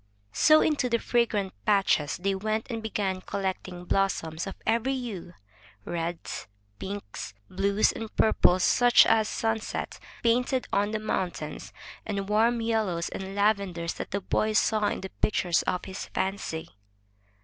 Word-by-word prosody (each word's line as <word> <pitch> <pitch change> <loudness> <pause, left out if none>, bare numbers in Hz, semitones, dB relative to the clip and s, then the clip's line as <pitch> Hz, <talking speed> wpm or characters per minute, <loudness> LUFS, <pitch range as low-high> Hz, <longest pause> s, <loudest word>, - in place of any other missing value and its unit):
So 310 0 +6
into 290 -5 +1
the 235 - +3
fragrant 225 -5 0
patches 195 -7 +2
they 195 +2 0
went 215 +3 -1
and 225 -1 -3
began 200 -4 -2
collecting 185 -2 -4
blossoms 170 -4 0
of 195 - -6
every 235 +4 +1
hue 200 -9 -6 0.2
— 100 -1 -26
reds, 170 - -4 0.3
pinks, 195 - -6 0.2
blues, 200 +3 +2
and 225 -1 -6
purples 185 -4 +4
such 245 0 +6
as 220 -1 +3
sunset 225 -1 -2 0.2
painted 250 +2 +2
on 205 +1 +2
the 215 - -1
mountains, 180 -7 -3 0.3
and 200 -2 -3
warm 230 +3 +3
yellows 215 -7 0
and 190 0 -6
lavenders 200 -5 +1
that - - -6
the 200 - -2
boy 215 +3 0
saw 215 -1 +3
in - - -2
the 190 - -6
pictures 175 -5 +2
of 180 - -1
his 190 +1 -6
fancy. 190 -4 -3
200 Hz, 145 wpm, -27 LUFS, 185-220 Hz, 0.3 s, So